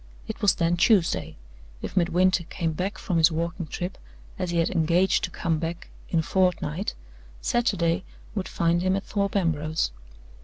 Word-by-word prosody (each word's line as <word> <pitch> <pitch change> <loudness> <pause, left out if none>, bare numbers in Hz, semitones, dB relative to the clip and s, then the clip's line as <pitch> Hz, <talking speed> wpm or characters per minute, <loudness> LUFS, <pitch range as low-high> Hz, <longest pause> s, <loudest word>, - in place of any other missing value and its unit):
It - - -6
was 205 - +4
then 170 0 +1
Tuesday. 190 -2 +2 0.5
If - - -5
Midwinter 180 0 +3
came 165 -1 -2
back 185 +6 -3
from 175 -4 0
his 165 +1 +6
walking 170 +1 -2
trip, 180 +5 -5 0.4
as 185 -2 -1
he 170 - -1
had 165 - +2
engaged 175 +2 +3
to - - -7
come 165 -2 -1
back, 165 +1 -5 0.2
in 165 - +2
a - - -7
fortnight, 180 0 0 0.4
Saturday 185 - +1 0.3
would 195 -4 -2
find 170 +1 +1
him 185 +1 +2
at 195 - -2
Thorpe 200 -2 -1
Ambrose. 155 - 0
175 Hz, 165 wpm, -26 LUFS, 165-190 Hz, 0.5 s, his